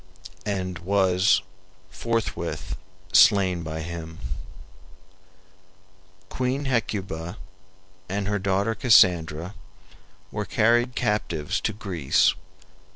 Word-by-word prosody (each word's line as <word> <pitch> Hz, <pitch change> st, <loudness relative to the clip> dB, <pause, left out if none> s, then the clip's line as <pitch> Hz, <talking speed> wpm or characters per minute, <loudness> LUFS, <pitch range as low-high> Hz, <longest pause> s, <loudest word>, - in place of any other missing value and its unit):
] -, -, -25 dB
and 90 Hz, -2 st, -4 dB
was 95 Hz, +1 st, +3 dB, 0.5 s
forthwith 115 Hz, -2 st, -3 dB, 0.4 s
slain 95 Hz, -3 st, +5 dB
by 80 Hz, 0 st, -5 dB
him. 80 Hz, -1 st, -7 dB, 2.1 s
Queen 130 Hz, +6 st, -2 dB
Hecuba 100 Hz, -9 st, -2 dB, 0.7 s
and 100 Hz, +1 st, -2 dB
her 105 Hz, 0 st, 0 dB
daughter 100 Hz, +3 st, +1 dB
Cassandra 90 Hz, -7 st, +4 dB, 0.8 s
were -, -, -3 dB
carried 120 Hz, +3 st, +2 dB
captives 85 Hz, -8 st, -1 dB
to -, -, 0 dB
Greece. 95 Hz, -9 st, +1 dB
95 Hz, 85 wpm, -25 LUFS, 85-110 Hz, 2.1 s, slain